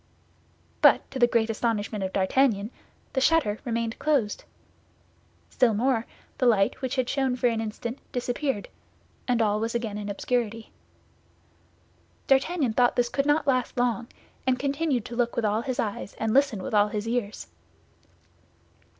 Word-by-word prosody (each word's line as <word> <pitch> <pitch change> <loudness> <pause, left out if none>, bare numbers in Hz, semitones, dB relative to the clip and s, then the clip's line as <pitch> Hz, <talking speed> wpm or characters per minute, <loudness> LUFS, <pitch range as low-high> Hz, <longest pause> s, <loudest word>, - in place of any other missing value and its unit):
But - - +5
to 265 - -5
the 240 - +6
great 225 -1 +1
astonishment 215 -2 -2
of 190 - -2
D'Artagnan, 205 +2 +1 0.4
the 265 - +1
shutter 260 -9 +2
remained 230 -1 -2
closed. 275 -9 0 1.1
Still 240 -5 +3
more, 235 0 +1 0.3
the 255 - +3
light 200 -1 +2
which 260 -1 -2
had 255 -2 0
shone 270 -2 0
for 250 - -2
an 230 -2 +2
instant 230 +3 -5
disappeared, 245 -1 -2 0.6
and 240 -2 +2
all 210 0 +1
was 225 +2 -2
again 220 -3 -2
in 205 0 -5
obscurity. 225 +1 -2 1.5
D'Artagnan 270 -1 +2
thought 245 +1 +3
this 240 -1 +1
could 275 +3 -1
not 295 +1 +2
last 255 -3 0
long, 240 -1 0 0.4
and 255 -1 +3
continued 280 -2 -1
to 235 - -7
look 240 -1 0
with 235 - 0
all 210 +1 +1
his 255 +1 -4
eyes 205 -2 -3
and 220 -1 -1
listen 270 -8 +2
with - - -5
all 205 0 +5
his 210 +1 -4
ears. 230 -3 -2
235 Hz, 155 wpm, -26 LUFS, 215-260 Hz, 1.5 s, the